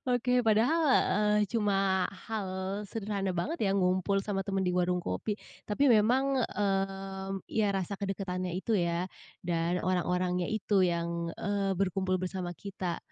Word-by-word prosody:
Oke, 250 0 +2
padahal, 225 +10 +4 0.3
eee, 210 0 +3
cuma 195 -3 +2 0.2
hal 215 -4 -3 0.4
sederhana 200 -3 -2
banget 320 - -2
ya, 195 - +2
ngumpul 185 +1 +2
sama 200 -2 -1
teman 195 -1 -1
di 180 - +1
warung 180 0 +2
kopi, 200 - -2 0.3
tapi 275 +7 +2
memang, 240 +3 +5 0.2
mmm, 195 -1 -2
ya 220 -1 +1
rasa 190 +1 -2
kedekatannya 185 -2 -2
itu 225 - -2
ya 170 -1 +1 0.4
dan 170 +1 +1
orang-orangnya 180 0 +1
itu 210 -2 +2
yang, 170 -1 0
eee, 200 -2 0
berkumpul 190 -1 +1
bersama 185 -1 -3
kita. 190 -3 -3
195 Hz, 135 wpm, -30 LUFS, 180-210 Hz, 0.4 s, memang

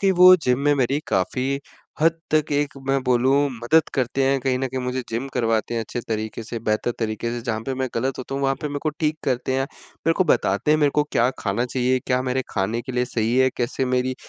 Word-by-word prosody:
कहीं 195 - +3
वो 185 +1 +8
जिम 125 0 +2
में 145 +1 +3
मेरी 135 +1 +1
काफ़ी 130 +9 0 0.4
हद 165 +1 +3 0.2
तक 155 -1 +2
एक 145 0 0
मैं 135 0 +2
बोलूँ 125 +1 +3 0.2
मदद 130 +6 +2
करते 130 +1 0
हैं, 135 +1 +2
कहीं 130 -1 0
न 135 - -1
कहीं 130 +1 -3
मुझे 125 +1 -2
जिम 115 +4 -2
करवाते 115 -1 0
हैं 115 - 0
अच्छे 115 +2 -4
तरीके 110 0 -3
से 115 +1 -5
बेहतर 110 +1 0
तरीके 110 0 -2
से, 120 0 -3
जहाँ 110 -2 -2
पर 135 - -1
मैं 130 0 -2
गलत 130 +3 -1
होता 130 +1 -5
हूँ 140 - -2
वहाँ 135 0 +2
पे 150 - -2
मेरे 145 - -3
को 155 - +1
ठीक 155 -1 +1
करते 130 -1 0
हैं, 135 - +1
मेरे 165 +3 -4
को 185 - +3
बताते 150 - +1
हैं 155 - +4
मेरे 145 -2 +3
को 150 - +4
क्या - - +3
खाना 105 +4 -1
चाहिए, 130 +1 +1
क्या 125 -1 +2
मेरे 130 0 -1
खाने 105 +4 -1
के 130 - -7
लिए 125 0 +1
सही 120 -1 -1
है, 130 0 +5
कैसे 120 +2 -1
मेरी 130 0 0
130 Hz, 245 wpm, -23 LUFS, 120-140 Hz, 0.4 s, वो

